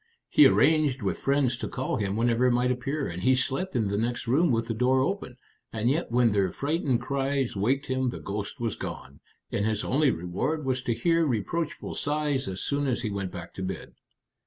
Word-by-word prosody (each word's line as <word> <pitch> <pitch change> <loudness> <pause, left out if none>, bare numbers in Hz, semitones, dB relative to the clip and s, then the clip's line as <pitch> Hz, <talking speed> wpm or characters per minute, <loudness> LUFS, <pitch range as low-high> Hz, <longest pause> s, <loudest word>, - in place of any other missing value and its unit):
He 300 - +7
arranged 150 -5 +3
with 95 - -1
friends 135 -2 +1
to 130 - -4
call 130 - -2
him 100 -2 -1
whenever 120 +2 +2
it - - +3
might 125 +1 +2
appear, 135 +4 -2
and 85 +1 -5
he 130 +6 +4
slept 135 +7 -2
in 110 -4 +1
the 100 +1 -1
next 120 +2 -2
room 145 +9 +3
with 115 -2 +1
the 115 - -2
door 125 +3 +2
open; 135 -6 -2 0.3
and 115 +3 +1
yet 160 +5 -1
when 120 -1 +3
their 100 -2 +2
frightened 140 - -1
cries 135 -3 -1
waked 130 +8 +1
him 130 -1 0
the - - -5
ghost 100 +6 -5
was 115 -3 -2
gone, - - -7 0.3
and 100 - 0
his 110 -1 0
only 145 +2 +2
reward 125 - -2
was 130 -1 0
to 120 -2 -1
hear 165 +3 +2
reproachful 145 - -2
sighs 145 -2 0
as 95 0 -4
soon 145 0 0
as 125 -1 -1
he 110 - -2
went 100 -2 -3
back 85 -3 -8
to - - -7
bed. 95 -2 -5
125 Hz, 210 wpm, -27 LUFS, 110-140 Hz, 0.3 s, He